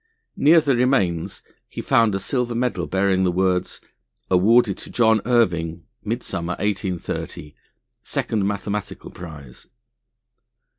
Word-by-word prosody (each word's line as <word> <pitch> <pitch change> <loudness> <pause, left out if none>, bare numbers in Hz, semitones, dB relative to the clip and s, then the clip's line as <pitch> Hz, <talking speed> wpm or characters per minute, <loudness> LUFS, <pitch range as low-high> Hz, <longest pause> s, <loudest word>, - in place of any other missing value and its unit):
Near 160 +4 +6
the 140 -4 +1
remains 120 -10 0 0.3
he - - -8
found 115 -4 +3
a - - -1
silver 125 0 -2
medal 115 -8 -1
bearing 95 0 +1
the 90 - +2
words, 90 0 0 0.5
"Awarded 105 +3 +4
to - - -10
John 110 -3 +3
Irving, 85 -9 +1 0.2
Midsummer, 105 -6 -3
1830, 95 -6 -4 0.5
Second 105 -3 -1
Mathematical 100 -1 -4
Prize." 75 -7 -11
100 Hz, 110 wpm, -22 LUFS, 90-120 Hz, 0.5 s, Near